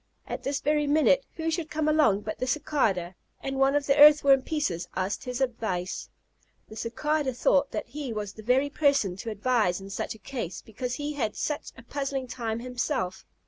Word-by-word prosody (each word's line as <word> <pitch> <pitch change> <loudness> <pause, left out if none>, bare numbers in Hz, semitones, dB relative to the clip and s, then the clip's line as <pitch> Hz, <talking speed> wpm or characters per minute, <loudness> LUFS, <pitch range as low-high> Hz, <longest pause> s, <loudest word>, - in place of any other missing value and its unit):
At - - -5
this 280 0 -2
very 295 0 +1
minute, 405 +13 +3
who 325 0 -1
should 320 -1 -2
come 305 0 -1
along 300 -10 +4
but 215 0 -5
the 255 - -1
Cicada, 225 - 0 0.3
and 270 0 -4
one 270 +1 +4
of 290 -1 +1
the 275 - +3
Earthworm 290 -2 +7
pieces 225 - -2
asked 190 +2 -2
his 250 +1 -4
advice. 220 -8 -2 0.6
The 220 - -10
Cicada 265 +4 -1
thought 275 +3 +3
that - - -4
he 275 +1 -6
was 210 -2 -4
the 215 - -11
very 260 +6 +2
person 280 -12 +2
to 225 - -5
advise 215 -4 +1
in 195 +1 -9
such 195 - -3
a 220 - -19
case, 235 -10 -5
because 245 +3 -4
he 295 +1 -3
had 285 - -5
had 215 - -1
such 295 -1 -3
a 230 - -12
puzzling 275 +1 -3
time 230 -2 -4
himself. 250 -5 -3
260 Hz, 195 wpm, -27 LUFS, 220-290 Hz, 0.6 s, Earthworm